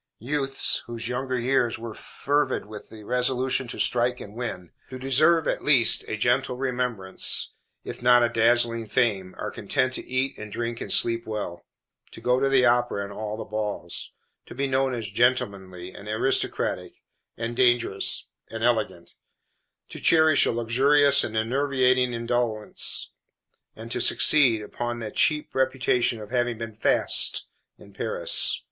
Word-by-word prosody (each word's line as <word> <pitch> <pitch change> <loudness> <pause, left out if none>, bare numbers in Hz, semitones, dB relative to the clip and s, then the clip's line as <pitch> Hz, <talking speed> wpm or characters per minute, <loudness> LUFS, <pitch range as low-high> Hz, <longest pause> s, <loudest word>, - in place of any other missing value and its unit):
Youths, 135 +2 +1
whose 115 -1 -6
younger 130 +1 -2
years 120 -1 +1
were 115 -1 -7
fervid 145 0 -2
with 105 0 -10
the 110 -1 -12
resolution 125 +2 0
to - - -5
strike 125 0 +1
and 100 - -10
win, 105 -7 -6 0.2
to 130 - -7
deserve, 150 +6 +3
at - - -2
least, 135 -6 +4
a 110 - -3
gentle 125 +3 0
remembrance, 125 -7 -1 0.3
if - - -8
not 120 0 +5
a 120 - +2
dazzling 115 0 +2
fame, 100 -5 0
are - - -5
content 130 0 -1
to - - -4
eat, 130 +1 -2
and 105 -1 -8
drink, 115 +1 -4
and - - -5
sleep 115 -1 +2
well; 100 -6 -6 0.5
to - - -10
go 125 +2 +1
to 135 0 +1
the 130 -2 +4
opera 120 -3 +1
and 100 0 -8
all 105 +1 -5
the - - -6
balls; 105 -5 -4 0.4
to - - -11
be 140 +2 -1
known 135 0 0
as 110 -4 -4
"gentlemanly," 100 -6 -1
and 100 - -11
"aristocratic," 110 +5 -1 0.3
and 115 +1 -4
"dangerous," 120 -5 +2 0.2
and 115 0 -6
"elegant"; 110 -7 -1 0.8
to - - -9
cherish 160 -3 +4
a - - +1
luxurious 140 +5 +3
and 110 0 -4
enervating 130 +1 +1
indolence, 115 -2 -1 0.6
and 115 +1 -10
to - - -2
"succeed," 125 -8 +4
upon 120 +3 -5
the 110 -2 -6
cheap 150 -1 +1
reputation 130 -3 +1
of 105 +1 -10
having 120 -2 0
been 115 0 -6
"fast" 105 - +1 0.3
in - - -17
Paris. - - 0
120 Hz, 155 wpm, -25 LUFS, 110-130 Hz, 0.8 s, not